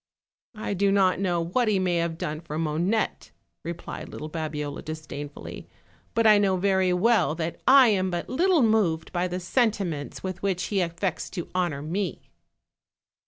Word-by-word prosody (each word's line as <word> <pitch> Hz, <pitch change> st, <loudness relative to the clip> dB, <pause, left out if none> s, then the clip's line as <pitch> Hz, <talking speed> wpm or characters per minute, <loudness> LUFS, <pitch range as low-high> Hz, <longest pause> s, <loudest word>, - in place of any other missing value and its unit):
"I 215 Hz, -1 st, -3 dB
do 200 Hz, +1 st, +2 dB
not 190 Hz, -2 st, +3 dB
know 180 Hz, -3 st, +1 dB
what 205 Hz, +9 st, 0 dB
he 210 Hz, -2 st, +3 dB
may 180 Hz, -2 st, +1 dB
have 165 Hz, -1 st, -1 dB
done 155 Hz, 0 st, -4 dB
for 155 Hz, -2 st, -6 dB
Monette," 165 Hz, +7 st, -1 dB, 0.3 s
replied 170 Hz, 0 st, -6 dB
little 155 Hz, +1 st, -7 dB
Babiola 150 Hz, -3 st, -4 dB
disdainfully; 145 Hz, -2 st, -7 dB, 0.5 s
"but 230 Hz, -, +2 dB
I 210 Hz, -1 st, +7 dB
know 195 Hz, -2 st, +2 dB
very 190 Hz, -1 st, +2 dB
well 180 Hz, -4 st, +3 dB
that 165 Hz, 0 st, -4 dB
I 265 Hz, -2 st, +8 dB
am 190 Hz, -3 st, +1 dB
but 175 Hz, -1 st, -3 dB
little 340 Hz, +2 st, +3 dB
moved 205 Hz, -8 st, +2 dB
by 180 Hz, 0 st, 0 dB
the 180 Hz, +1 st, -3 dB
sentiments 185 Hz, -, -1 dB
with 185 Hz, -1 st, -4 dB
which 190 Hz, -2 st, 0 dB
he 195 Hz, -, +3 dB
affects 170 Hz, +1 st, -2 dB
to 175 Hz, -3 st, -6 dB
honor 175 Hz, -6 st, -1 dB
me." 180 Hz, +4 st, -4 dB
180 Hz, 165 wpm, -26 LUFS, 165-200 Hz, 0.5 s, I